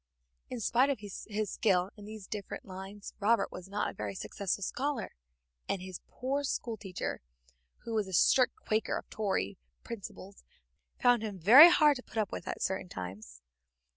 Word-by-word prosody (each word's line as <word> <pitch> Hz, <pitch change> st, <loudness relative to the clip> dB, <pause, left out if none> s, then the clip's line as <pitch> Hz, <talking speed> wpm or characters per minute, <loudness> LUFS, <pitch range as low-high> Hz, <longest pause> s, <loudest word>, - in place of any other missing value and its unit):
In 250 Hz, -, -4 dB
spite 245 Hz, +5 st, +3 dB
of 280 Hz, -, +1 dB
his 205 Hz, -2 st, -8 dB, 0.2 s
skill 190 Hz, -2 st, +1 dB
in 205 Hz, -, -11 dB
these 215 Hz, -2 st, -8 dB
different 205 Hz, 0 st, -6 dB
lines, 195 Hz, +2 st, -8 dB
Robert 225 Hz, +3 st, +2 dB
was 185 Hz, +1 st, -9 dB
not 205 Hz, +1 st, -1 dB
a -, -, -5 dB
very 105 Hz, -2 st, -5 dB
successful 200 Hz, -, -3 dB
scholar, 270 Hz, +2 st, -2 dB, 0.6 s
and 195 Hz, -, 0 dB
his 185 Hz, -1 st, -8 dB
poor 275 Hz, +3 st, -2 dB
schoolteacher, 220 Hz, -8 st, -3 dB, 0.6 s
who 230 Hz, -, -5 dB
was 215 Hz, -3 st, 0 dB
a 190 Hz, -, -8 dB
strict 250 Hz, +8 st, +4 dB
Quaker 220 Hz, -, -1 dB
of -, -, -8 dB
Tory 190 Hz, -, -1 dB, 0.2 s
principles, 200 Hz, -3 st, -9 dB, 0.6 s
found 245 Hz, -2 st, +4 dB
him 210 Hz, -3 st, -4 dB
very 245 Hz, -, +10 dB
hard 300 Hz, -5 st, +5 dB
to 250 Hz, -, -10 dB
put -, -, -11 dB
up 210 Hz, -3 st, 0 dB
with -, -, -6 dB
at -, -, -3 dB
certain 190 Hz, -1 st, -2 dB
times. 90 Hz, -, -8 dB
205 Hz, 170 wpm, -31 LUFS, 190-235 Hz, 0.6 s, very